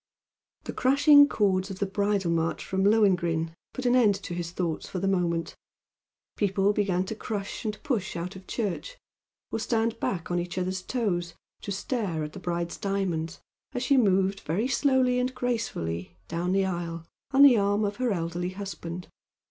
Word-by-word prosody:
The - - -5
crashing 285 +2 +6
chords 190 -2 +1
of 195 - -6
the 200 - 0
Bridal 200 -2 0
March 165 0 -1
from 190 0 0
"Lohengrin" 180 -6 +3 0.2
put 260 - -6
an 245 0 +4
end 220 -5 +5
to 195 -2 -6
his 170 -1 -3
thoughts 170 -2 -3
for - - -4
the 195 +2 -1
moment, 170 -3 0 0.8
people 200 0 +2
began 190 -3 +1
to 205 - -4
crush 205 -1 -4
and 215 -1 -2
push 225 -11 -1
out 175 +3 -4
of 190 0 -12
church, 230 - -3 0.5
or - - -1
stand 225 0 0
back 175 -2 -2
on 175 - +1
each 175 +1 -5
other's 185 0 -1
toes 180 -7 -2 0.3
to 200 - -5
stare 195 -5 -2
at 150 0 -6
the - - -8
bride's 175 -1 -3
diamonds 180 -5 -2 0.3
as 245 - -2
she 280 - +3
moved 195 -4 +3
very 195 +10 -1
slowly 260 -1 +2
and 255 +1 -1
gracefully 90 - -3
down 175 +2 -2
the 195 0 +2
aisle 170 -2 -4 0.2
on 275 0 +6
the 265 -5 +8
arm 205 +1 +2
of 205 0 -3
her 250 -2 0
elderly 175 -1 -2
husband. 180 -3 -6
195 Hz, 175 wpm, -27 LUFS, 175-225 Hz, 0.8 s, the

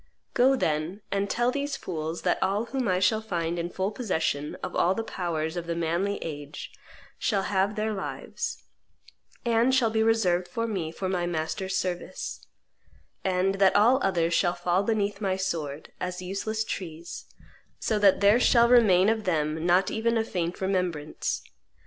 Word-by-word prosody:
Go, 260 +2 +5
then, 160 -1 -1
and 200 0 0
tell 240 +1 +1
these 285 +2 -2
fools 160 -1 -4
that - - +1
all 205 +4 +1
whom 260 0 -2
I 185 -1 +2
shall 205 +4 +2
find 175 -5 -2
in 170 +1 -2
full 190 +3 -2
possession 160 - -1
of - - -4
all 185 +2 +3
the 225 - -2
powers 165 -5 -3
of 170 -1 -4
the 170 - -1
manly 170 +5 0
age 145 -2 -7 0.5
shall 200 -3 +1
have 195 +1 +1
their 215 0 -1
lives, 195 - -5 0.8
and 235 +2 +3
shall 235 -4 +3
be 220 0 +1
reserved 185 -6 +2
by 230 - 0
me 185 -8 -3
for 185 +3 -4
my 180 -2 -1
master's 175 +3 -2
service, 180 -2 -4 0.8
and 190 +1 +1
that 195 -1 +5
all 235 +6 +5
other 170 -3 +1
shall 175 +1 +2
fall 180 +2 +1
beneath 205 -1 -1
my 190 -2 +1
sword, 160 -6 -3
as 180 0 -3
useless 200 +4 -2
trees, 170 -5 -6 0.5
so 215 -2 0
that 200 -1 +5
there 205 +4 +6
shall 235 -1 +5
remain 205 -7 +6
of 220 -1 +1
them 160 -1 0
not 185 +2 +3
even 230 +1 +1
a 225 - +2
faint 175 -5 -3
remembrance. 180 -6 -1
190 Hz, 165 wpm, -27 LUFS, 170-220 Hz, 0.8 s, there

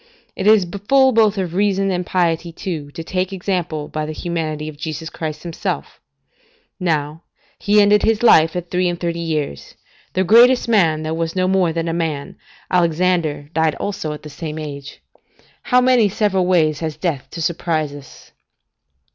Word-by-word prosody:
It 190 - -2
is 215 -3 +6 0.2
full 270 -1 +5
both 220 -3 +3
of 180 -3 -2
reason 195 0 +1
and 180 -1 -1
piety, 170 -2 0
too, 160 -4 -5
to 165 - -6
take 185 +2 -2
example 175 -5 -3
by 155 0 -4
the 155 - -5
humanity 155 -3 -3
of 155 - -7
Jesus 160 +1 -6
Christ 155 -2 -5
Himself; 170 -2 -4 0.8
now, 155 -3 -1 0.4
He 205 +1 +3
ended 205 0 +5
His 225 0 +1
life 160 -8 +5
at 175 -1 -5
three 180 0 +1
and 175 -1 -4
thirty 170 -1 -2
years. 155 - -4 0.4
The 185 - +1
greatest 240 +7 +5
man, 165 -9 +2
that 155 +1 -2
was 165 +1 -3
no 185 0 +1
more 185 -3 +2
than 165 0 -3
a 165 - -1
man, 160 -4 -3 0.3
Alexander, 170 -4 +1
died 160 -1 +1
also 195 -6 -4
at 150 - -8
the 150 - -8
same 155 +1 -6
age. 140 -2 -8 0.6
How 250 - +3
many 250 -4 +4
several 190 -2 0
ways 155 -5 +2
has 160 -2 -4
death 160 -8 -3
to - - -8
surprise 160 -2 -1
us? 145 -1 -13
170 Hz, 170 wpm, -19 LUFS, 155-190 Hz, 0.8 s, is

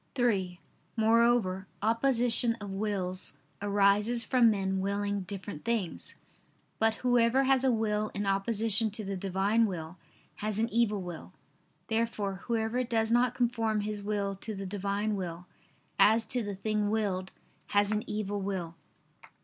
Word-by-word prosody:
(3) 195 -8 0 0.4
Moreover, 225 -4 +2 0.2
opposition 235 0 +2
of 205 -4 -8
wills 195 -4 -2 0.3
arises 205 +3 +3
from 245 -2 +4
men 190 -2 0
willing 200 +1 -1
different 190 -3 -7
things. 230 -7 -3 0.6
But 225 0 +3
whoever 245 +1 +4
has 265 -1 +3
a 265 - +4
will 215 -2 0
in 205 0 -2
opposition 215 +2 +4
to 210 0 -5
the 195 0 -3
Divine 195 +4 +1
will, 170 -2 -6 0.4
has 210 -1 -3
an 225 +1 +1
evil 215 -4 +1
will. 165 - -8 0.5
Therefore 220 -4 -1
whoever 230 +1 0
does 225 -2 0
not 240 +1 +3
conform 230 -3 0
his 210 0 -3
will 200 -1 -2
to 215 +2 -6
the 195 0 -6
Divine 200 +2 -2
will, 180 -2 -5 0.5
as 220 +2 +5
to 250 - 0
the 205 -2 -4
thing 210 +1 -1
willed, 195 -4 -1 0.4
has 205 0 +2
an 215 0 0
evil 205 -1 -3
will. 185 -4 -3
210 Hz, 140 wpm, -30 LUFS, 195-230 Hz, 0.6 s, as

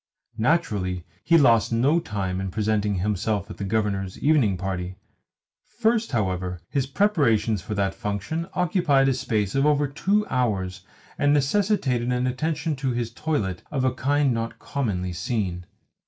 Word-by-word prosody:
Naturally 105 - 0 0.2
he 170 - +5
lost 115 -8 +4
no 135 +9 +3
time 95 - -3
in 95 - -3
presenting 105 0 0
himself 100 +2 -1
at - - -9
the - - -5
Governor's 100 -2 -1
evening 140 -11 +3
party. 90 -1 -4 0.7
First, 225 -3 0
however, 90 -6 -1
his 135 -2 0
preparations 135 - +2
for 105 +3 -5
that 100 -1 0
function 105 - -3
occupied 165 -6 +3
a - - +2
space 105 -6 -1
of 135 - +2
over 145 -1 +3
two 195 +9 +1
hours, 100 -7 -1 0.4
and 145 0 +4
necessitated 140 - +1
an 125 0 0
attention 150 +4 -1
to 135 -2 -1
his 120 -1 -3
toilet 115 - -2
of 135 -3 -1
a 130 - +2
kind 145 0 +1
not 115 0 -3
commonly 95 -10 -2
seen. 90 -1 -3
115 Hz, 150 wpm, -24 LUFS, 100-145 Hz, 0.7 s, he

